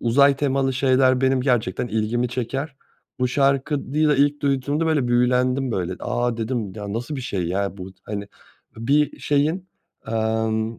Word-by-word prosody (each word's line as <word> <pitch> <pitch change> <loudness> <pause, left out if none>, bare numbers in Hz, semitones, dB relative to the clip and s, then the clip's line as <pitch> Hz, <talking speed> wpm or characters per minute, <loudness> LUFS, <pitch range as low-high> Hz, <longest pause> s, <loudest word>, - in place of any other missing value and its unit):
uzay 140 +4 +4
temalı 135 -1 +1
şeyler 130 -1 +3
benim 130 0 +2
gerçekten 120 -4 0
ilgimi 115 +3 0
çeker. 135 +4 -4 0.4
Bu 125 - +2
şarkıyı 140 +3 +1
da 150 - +3
ilk 145 +2 +2
duyduğumda, 140 +3 0
böyle, 145 -6 +1
büyülendim 125 +1 +2
böyle. 90 -1 -2
"A," 120 -1 -1
dedim 110 -3 -3
"ya, 105 -2 -6
nasıl 120 +7 -4
bir 130 - -4
şey 100 -7 -3
ya 100 +2 -2
bu?" 95 +1 -8
Hani, 100 -1 -5 0.5
bir 140 +6 +1
şeyin, 155 +6 0 0.4
emm, 110 0 -1
125 Hz, 150 wpm, -22 LUFS, 110-140 Hz, 0.5 s, uzay